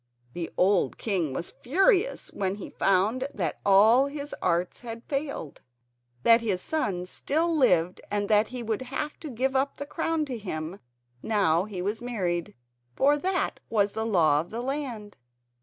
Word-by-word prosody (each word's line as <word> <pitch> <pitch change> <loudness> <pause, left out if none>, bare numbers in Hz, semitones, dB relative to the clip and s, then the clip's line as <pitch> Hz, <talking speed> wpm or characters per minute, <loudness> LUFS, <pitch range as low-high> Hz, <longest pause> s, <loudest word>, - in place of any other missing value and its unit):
The 170 -2 -4
old 195 +2 +3
king 185 -9 -1
was 170 +6 -4
furious 385 - +2
when 195 -1 -2
he 205 - -8
found 210 +8 +1
that 170 -7 -2
all 220 +7 +6
his 285 0 -6
arts 175 0 0
had 230 -1 -8
failed; 275 - -4 0.6
that 230 0 +6
his 205 -5 0
son 190 - -2
still 320 - -1
lived 180 - +3
and 205 0 -1
that 210 +1 +4
he 250 -1 -6
would 220 +1 -2
have 275 +4 -4
to 310 - -7
give 260 +2 -1
up 270 +1 +1
the 285 - -5
crown 320 +1 -1
to 255 -5 -5
him 170 -2 -5 0.4
now 190 -5 +2
he 190 -4 -5
was 210 +4 -2
married, 180 -9 -2 0.4
for 285 +2 +4
that 370 +3 -1
was 205 -2 +2
the 220 +2 -3
law 165 -9 +3
of 170 - -11
the 230 +2 -4
land. 250 -6 -4
220 Hz, 165 wpm, -27 LUFS, 185-270 Hz, 0.6 s, all